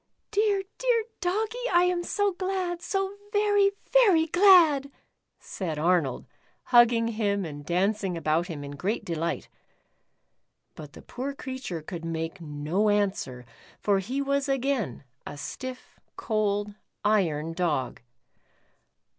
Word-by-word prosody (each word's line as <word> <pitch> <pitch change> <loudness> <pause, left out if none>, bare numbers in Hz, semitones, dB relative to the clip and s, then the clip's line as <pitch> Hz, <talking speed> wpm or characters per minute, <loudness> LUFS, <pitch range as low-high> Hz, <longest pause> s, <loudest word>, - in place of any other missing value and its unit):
" - - -50
Dear, 410 -2 +2 0.2
dear - - +2 0.2
Doggie, 445 +7 -1
I 350 0 +5
am 360 -1 +1
so 405 +2 0
glad, 365 -2 -2
so 390 +1 -2
very, 410 -1 +3 0.2
very 400 -11 +6
glad," 330 -6 +5 0.5
said 165 -6 -5
Arnold, 160 -4 +1 0.4
hugging 235 -1 +5
him 205 -3 -1
and 145 -2 -7
dancing 190 +2 0
about 165 +2 0
him 155 -5 -6
in 140 - -7
great 185 +11 -3
delight. 170 0 -2 1.3
But 150 -2 -11
the - - -13
poor 270 +3 -5
creature 260 - -6
could 170 +1 -7
make 165 +2 -4
no 155 +7 -1
answer, 195 -12 -1 0.3
for 200 -2 +2
he 255 +9 -2
was 280 0 0
again 265 - -1 0.2
a - - -7
stiff, 255 - -8 0.2
cold, 205 -2 -1 0.3
iron 165 -7 +1
Dog. 160 -7 -1
215 Hz, 125 wpm, -27 LUFS, -, 1.3 s, very